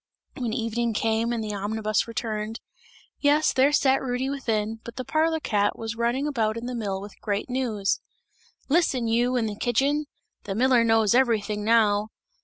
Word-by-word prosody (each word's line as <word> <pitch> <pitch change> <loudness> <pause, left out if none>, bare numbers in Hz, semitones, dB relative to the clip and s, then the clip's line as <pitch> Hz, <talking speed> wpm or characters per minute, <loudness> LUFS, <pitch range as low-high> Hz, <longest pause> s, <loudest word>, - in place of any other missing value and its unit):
When 245 -3 -3
evening 230 -1 -1
came 225 +2 +1
and 230 -2 -2
the 210 -1 -4
omnibus 215 +1 -1
returned, 220 -1 -4 0.6
yes, 295 +1 +3
there 270 +2 +4
sat 270 -2 +3
Rudy 260 +1 -2
within, 225 -5 -2
but 235 - -9
the 255 - -5
parlour 320 +3 +1
cat, 205 -7 0
was 225 0 -4
running 240 +4 0
about 225 -6 0
in 230 - -5
the 250 - -4
mill 205 -5 -3
with 200 +1 -11
great 210 +3 -2
news. 225 -6 0 0.7
"Listen, 275 -6 +2
you, 240 +3 +2
in 235 - +1
the 210 -1 -3
kitchen! 275 +7 +1 0.4
The 195 - -3
miller 250 +1 +4
knows 225 -2 +3
everything 220 -5 +1
now. 215 -2 +3
230 Hz, 170 wpm, -25 LUFS, 215-255 Hz, 0.7 s, there